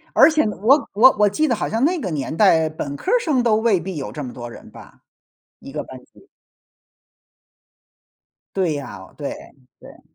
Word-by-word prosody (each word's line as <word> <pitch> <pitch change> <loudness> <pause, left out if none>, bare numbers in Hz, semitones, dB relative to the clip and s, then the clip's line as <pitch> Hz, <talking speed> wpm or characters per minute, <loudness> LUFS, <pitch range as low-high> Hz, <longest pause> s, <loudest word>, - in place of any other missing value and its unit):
而 - - +7
且 310 0 +2
呢， 210 - -3
我 265 +9 +3
我 240 +5 +6
我 210 - +4
记 305 +11 0
得 240 - +2
好 - - -3
像 225 +4 0
那 345 +3 +1
个 190 -9 -4
年 150 +1 -4
代， 165 -6 +4
本 145 -2 -6
科 380 - -3
生 285 - +1
都 225 -3 +2
未 220 -5 +2
必 185 +1 -6
有 140 - -5
这 150 - -6
么 125 - -7
多 120 -1 -8
人 - - -13
吧， - - -15 0.6
一 - - -11
个 150 - -4
班 130 -1 -12
级。 - - -23 2.3
对 180 -5 0
呀， 105 -10 -8
对， 145 - -5 0.5
对。 - - -15
195 Hz, 200 characters per minute, -20 LUFS, 145-240 Hz, 2.3 s, 而